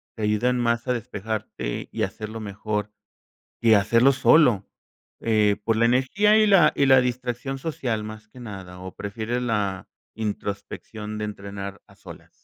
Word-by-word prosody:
te 110 - -5
ayudan 105 +4 +1
más 120 0 0
a 125 - +2
despejarte 110 - -4
y - - -2
hacerlo 110 +1 -5
mejor 105 0 -4 0.7
que 115 -2 +6
hacerlo 115 +7 +4
solo? 130 -6 +4 0.5
Eh, 105 -2 +2
por 115 - +1
la 115 - +3
energía 135 - +3
y 215 0 +5
la 195 -6 +6
y 140 - +2
la 130 -1 +7
distracción 125 +2 -3
social 130 -7 -3
más 110 0 -9
que 125 - -14
nada, 95 -6 -9
¿o 95 0 -8
prefieres 110 +4 -3
la 100 -5 -1 0.3
introspección 105 0 -5
de 105 - -2
entrenar 100 -1 -7
a - - -19
solas? - - -13
110 Hz, 155 wpm, -24 LUFS, 105-125 Hz, 0.7 s, la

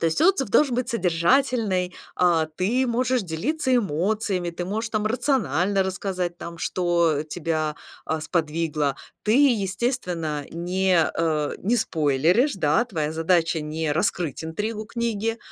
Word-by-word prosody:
То 165 - +2
есть 160 - 0
отзыв 345 - +3
должен 265 +3 +3
быть 250 0 -1
содержательный, 190 -1 +1 0.2
а, 170 -3 +3
ты 195 +11 0
можешь 250 +1 +1
делиться 255 - -1
эмоциями, 195 -1 0
ты 175 +1 -5
можешь 220 +4 -3
там 215 -1 0
рационально 200 - +1
рассказать 185 -2 -3
там, 170 0 -7
что 170 -5 +1
тебя, 155 -1 -2 0.3
а, 160 0 -1
сподвигло. 155 -4 -1 0.3
Ты, 215 - +2 0.2
естественно, 185 - -2
не, 180 +2 +1 0.2
э, 155 -3 0
не 225 +6 +1
спойлеришь, 165 - +2
да, 185 +5 +2
твоя 155 -9 -2
задача- 165 0 +1
не 155 0 -2
раскрыть 170 -2 -1
интригу 210 +6 -4
книги, 225 -1 -2
180 Hz, 130 wpm, -24 LUFS, 160-225 Hz, 0.3 s, отзыв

